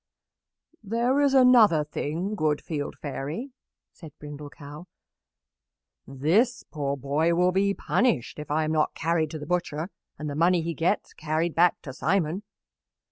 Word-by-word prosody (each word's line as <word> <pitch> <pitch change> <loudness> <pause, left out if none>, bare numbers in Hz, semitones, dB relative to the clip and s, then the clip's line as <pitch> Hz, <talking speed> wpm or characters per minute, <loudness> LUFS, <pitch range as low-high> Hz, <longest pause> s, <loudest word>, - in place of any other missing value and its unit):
"There 235 +6 +1
is 280 -1 +3
another 235 - +6
thing, 160 +6 -3
good 155 -7 0
Field 145 -3 -4
Fairy," 150 - -5 0.4
said 155 -5 -13
Brindle 150 0 -9
Cow. 150 +3 -11 1.2
"This 165 - +1
poor 140 -2 -3
boy 150 +5 +1
will 180 +1 +3
be 200 +2 +1
punished 205 - 0
if 150 - -7
I 155 +2 +1
am 155 - -1
not 155 -1 +1
carried 165 -1 0
to 155 - -6
the 150 - -7
butcher 175 0 -2 0.3
and 150 - -5
the 145 - -3
money 170 +3 +3
he 170 +1 -2
gets 175 +6 -1
carried 155 +2 -1
back 175 +1 +3
to 130 - -7
Simon. 175 +3 0
160 Hz, 150 wpm, -26 LUFS, 150-190 Hz, 1.2 s, another